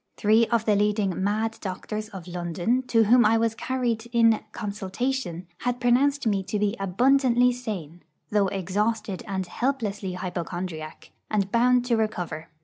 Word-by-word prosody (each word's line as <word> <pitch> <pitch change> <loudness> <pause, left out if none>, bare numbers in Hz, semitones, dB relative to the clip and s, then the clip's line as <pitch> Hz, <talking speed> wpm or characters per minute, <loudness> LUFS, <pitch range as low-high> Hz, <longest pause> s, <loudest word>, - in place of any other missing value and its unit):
Three 220 +2 +4
of 230 -2 +1
the 210 - +3
leading 205 -3 +1
'mad 220 +3 -1
doctors' 215 +3 -5
of 190 -5 -9
London, 175 +7 -1
to 225 -1 +4
whom 240 +3 +5
I 220 +2 +4
was 225 0 +1
carried 235 -2 -2
in 230 -2 +4
'consultation,' 205 -2 -3
had 245 0 -2
pronounced 260 +3 +2
me 200 -3 +2
to 200 +3 -3
be 205 +1 0
abundantly 250 +5 +3
sane, 190 -10 -6 0.3
though 205 -2 +3
exhausted 200 +2 -1
and 190 -2 -2
helplessly 210 -4 -2
hypochondriac, 175 -3 -5 0.2
and 200 -2 0
bound 245 +1 +3
to 240 -2 +2
recover. 175 -7 -3
215 Hz, 145 wpm, -25 LUFS, 190-235 Hz, 0.3 s, whom